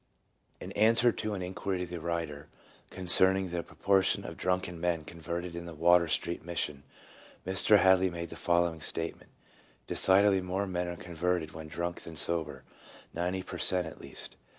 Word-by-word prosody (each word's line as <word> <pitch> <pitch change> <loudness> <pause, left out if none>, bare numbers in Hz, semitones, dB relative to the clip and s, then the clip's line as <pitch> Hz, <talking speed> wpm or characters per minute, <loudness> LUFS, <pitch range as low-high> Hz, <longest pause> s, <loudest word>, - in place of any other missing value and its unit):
In - - -8
answer 115 +3 +4
to 110 -2 -4
an 95 - -4
inquiry 95 0 -3
of 90 - -7
the 90 - -5
writer, 80 -3 -4 0.4
concerning 95 +1 +4
the 85 -1 -2
proportion 95 +2 +1
of - - -7
drunken 90 -2 -2
men 85 -2 0
converted 85 +2 -6
in 85 0 -6
the 85 - -8
Water 85 +2 +4
Street 85 +2 -1
Mission, 80 -4 -3 0.6
Mr. 95 +3 +5
Hadley 95 0 +4
made 85 -1 -6
the - - -7
following 85 -1 +1
state 80 +1 -3
ment: - - -20 0.3
— - - -32
"Decidedly 95 0 +3
more 95 +2 -2
men 90 -2 -3
are 85 - -4
converted 85 -1 -2
when 80 0 -9
drunk 85 +2 -4
than 80 -2 -10
sober, 75 -5 0 0.5
ninety 90 +2 -2
per - - -8
cent, 90 -1 +2
at 80 - -10
least. - - -9
85 Hz, 175 wpm, -30 LUFS, 85-95 Hz, 0.6 s, Mr